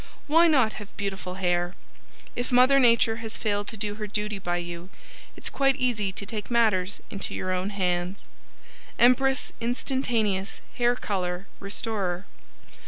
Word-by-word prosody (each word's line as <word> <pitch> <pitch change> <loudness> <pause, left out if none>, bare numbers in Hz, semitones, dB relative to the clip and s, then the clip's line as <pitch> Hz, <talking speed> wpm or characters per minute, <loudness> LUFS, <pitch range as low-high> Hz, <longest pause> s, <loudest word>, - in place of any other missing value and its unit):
] - - -28
Why 330 +3 +5
Not 260 -9 +4
Have 205 - -9
BEAUTIFUL 195 -2 -4
HAIR 175 -1 0 0.6
If 245 +1 -3
Mother 255 +2 +6
Nature 230 -3 +4
has 225 -1 -6
failed 205 -2 -1
to 220 - -6
do 205 0 -2
her 210 - -2
duty 210 0 -2
by 175 -2 -1
you 175 +1 -6 0.5
it's - - -3
quite 275 -1 +2
easy 220 -7 0
to 200 - -5
take 210 +1 -5
matters 210 -6 +2
into 195 - -4
your 185 - -2
own 185 +1 -1
hands 180 -1 -1 0.7
Empress 255 +2 +3
Instantaneous 230 -5 0 0.2
Hair 240 0 +4
Color 185 -5 -2
Restorer. 200 -3 -3
210 Hz, 150 wpm, -26 LUFS, 185-240 Hz, 0.7 s, Mother